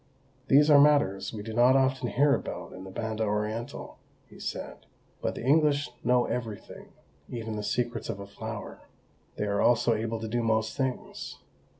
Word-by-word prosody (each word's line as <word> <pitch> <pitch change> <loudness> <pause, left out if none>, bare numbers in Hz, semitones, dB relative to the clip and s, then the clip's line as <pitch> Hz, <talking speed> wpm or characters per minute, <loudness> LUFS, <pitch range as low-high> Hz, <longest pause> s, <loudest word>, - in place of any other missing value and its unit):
"These 145 +3 +6
are 140 -1 +9
matters 145 -10 +3
we 105 -2 -6
do 110 +1 -6
not 120 +3 +5
often 130 -1 +2
hear 140 +4 +3
about - - -4
in 95 +1 -9
the - - -8
Banda 110 +2 -3
Orientál," 105 +2 -3 0.3
he - - -15
said. - - -6 0.3
"But - - -2
the - - -6
English 145 0 +3
know 125 -1 +3
everything 115 -5 -6 0.4
even 115 -2 -5
the 105 - -3
secrets 120 +1 -2
of 100 - -4
a 100 - -6
flower. 100 - -7 0.5
They 105 - -2
are 100 0 0
also 120 0 +4
able 115 +1 -2
to 110 - -4
do 120 +2 -1
most 110 -1 0
things. 130 -3 -4
115 Hz, 175 wpm, -28 LUFS, 110-130 Hz, 0.5 s, are